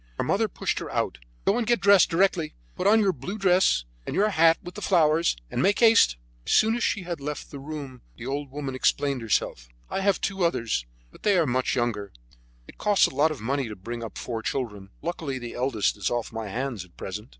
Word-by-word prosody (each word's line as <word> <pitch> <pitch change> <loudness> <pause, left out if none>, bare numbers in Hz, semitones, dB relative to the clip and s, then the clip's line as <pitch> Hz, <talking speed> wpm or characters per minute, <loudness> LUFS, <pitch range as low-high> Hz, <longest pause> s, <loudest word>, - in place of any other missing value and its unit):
Her - - 0
mother - - +1
pushed - - -2
her - - -6
out. 65 - -2 0.3
"Go 220 - +3
and 230 - -2
get 240 0 +3
dressed 200 -2 +6
directly; 175 -2 +1 0.2
put 185 - 0
on 220 +2 +6
your 195 -3 +2
blue 150 - -6
dress 185 - +3 0.2
and - - -5
your 210 +2 +3
hat 165 -3 +5
with 175 - -8
the 210 - -8
flowers, 165 - +3
and - - -1
make 200 +2 +3
haste." 225 - +5 0.3
As - - -1
soon 220 +1 +4
as 240 - -2
she 200 - 0
had 170 -4 -5
left 150 +1 -5
the 140 - -7
room 140 -3 -7 0.2
the 115 - -8
old 140 +1 -3
woman 140 -1 -5
explained 140 0 +1
herself: - - -1 0.2
"I - - -1
have 200 -1 +2
two 195 -2 -2
others, 115 - 0 0.2
but - - -17
they 205 -3 +3
are 170 - +3
much 130 -1 0
younger. 110 -5 -1 0.6
It - - -15
costs 205 -2 +4
a - - -3
lot 145 +4 +3
of 150 -8 -6
money 135 +3 -1
to 105 - -6
bring 115 +5 -6
up 115 - -7
four 115 -2 -4
children. 105 -6 -4
Luckily 160 -5 -3
the 120 -2 -7
eldest 120 -5 0
is - - -1
off 120 -1 -3
my 110 -1 -4
hands 120 -1 -3
at 90 -2 -21
present." 105 +5 -6
140 Hz, 230 wpm, -26 LUFS, 120-185 Hz, 0.6 s, dressed